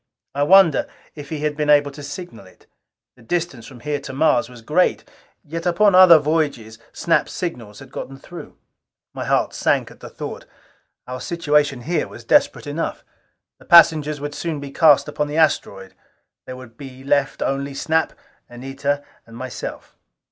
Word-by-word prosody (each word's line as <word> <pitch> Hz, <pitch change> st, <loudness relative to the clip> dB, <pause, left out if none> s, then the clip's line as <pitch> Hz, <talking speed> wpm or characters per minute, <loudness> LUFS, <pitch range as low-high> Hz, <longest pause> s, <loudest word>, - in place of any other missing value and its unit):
I 140 Hz, -, -2 dB
wondered 170 Hz, 0 st, +5 dB, 0.3 s
if 145 Hz, -2 st, -10 dB
he 155 Hz, -2 st, -5 dB
had 150 Hz, -1 st, -1 dB
been 150 Hz, 0 st, -2 dB
able 145 Hz, -1 st, +4 dB
to 145 Hz, +1 st, -11 dB
signal 145 Hz, -, -9 dB
it. 95 Hz, -, -22 dB, 0.5 s
The 125 Hz, -, -21 dB
distance 135 Hz, -3 st, -3 dB
from 120 Hz, -2 st, -13 dB
here 150 Hz, +1 st, -2 dB
to 140 Hz, -, -9 dB
Mars 135 Hz, -4 st, +2 dB
was 120 Hz, -2 st, -14 dB
great; 155 Hz, +9 st, +1 dB, 0.4 s
yet 165 Hz, +3 st, -5 dB
upon 195 Hz, +4 st, +3 dB
other 185 Hz, -2 st, +9 dB
voyages 145 Hz, -8 st, -2 dB
Snap's 165 Hz, -, 0 dB
signals 120 Hz, -, -6 dB
had 135 Hz, -, -13 dB
gotten 135 Hz, -, -7 dB
through. 175 Hz, +5 st, -12 dB, 0.6 s
My -, -, -5 dB
heart -, -, +1 dB
sank -, -, 0 dB
at -, -, -17 dB
the -, -, -10 dB
thought. -, -, -8 dB, 0.6 s
Our 125 Hz, 0 st, -7 dB
situation 150 Hz, -5 st, 0 dB
here 170 Hz, +7 st, -1 dB
was -, -, -12 dB
desperate -, -, +2 dB
enough. -, -, -4 dB, 0.6 s
The -, -, -18 dB
passengers 155 Hz, -3 st, +5 dB, 0.2 s
soon 165 Hz, -2 st, -3 dB
would 145 Hz, -, -7 dB
be 140 Hz, -1 st, -8 dB
cast 150 Hz, -1 st, +4 dB
upon 150 Hz, -, -2 dB
the 150 Hz, +2 st, -4 dB
asteroid: 100 Hz, -11 st, 0 dB, 0.5 s
there 130 Hz, -, -7 dB
would 120 Hz, -3 st, -13 dB
be 135 Hz, -2 st, -11 dB
left 140 Hz, 0 st, 0 dB
only 140 Hz, 0 st, -3 dB
Snap, 160 Hz, +3 st, 0 dB, 0.4 s
Anita 135 Hz, +3 st, -3 dB, 0.2 s
and 115 Hz, 0 st, -12 dB
myself. 130 Hz, 0 st, -7 dB
145 Hz, 170 wpm, -21 LUFS, 130-160 Hz, 0.6 s, other